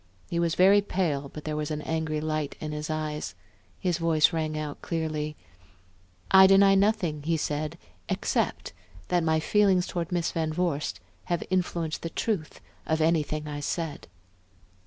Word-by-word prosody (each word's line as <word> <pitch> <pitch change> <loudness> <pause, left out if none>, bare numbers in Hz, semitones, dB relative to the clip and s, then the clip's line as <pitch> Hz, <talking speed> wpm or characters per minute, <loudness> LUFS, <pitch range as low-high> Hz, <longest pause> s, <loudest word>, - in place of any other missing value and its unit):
He 170 - 0
was 170 0 +1
very 195 +3 +6
pale, 160 -8 -1
but 150 - -9
there 155 -1 -3
was 150 -1 -2
an 150 -1 -3
angry 160 -1 -1
light 155 -1 -2
in 155 - -4
his 150 0 -4
eyes; 150 -10 -3 0.4
his 180 -2 0
voice 165 -2 +3
rang 155 -1 -1
out 150 -1 -5
clearly. 155 -2 -2 1.0
"I 190 0 +9
deny 195 0 +6
nothing," 195 -6 +2
he 165 +2 0
said, 150 0 -2 0.3
"except - - -1 0.4
that 175 -1 +2
my 160 -1 +2
feelings 190 +1 +3
toward 170 -1 -4
Miss 175 -1 0
Van 160 -1 -1
Vorst 165 -4 -1 0.3
have 175 -1 -1
influenced 175 -3 -1
the 165 - -4
truth 175 -3 -3 0.3
of 160 0 +1
anything 155 -2 +1
I 145 -1 -4
said." 160 +1 -3
160 Hz, 155 wpm, -27 LUFS, 150-175 Hz, 1.0 s, I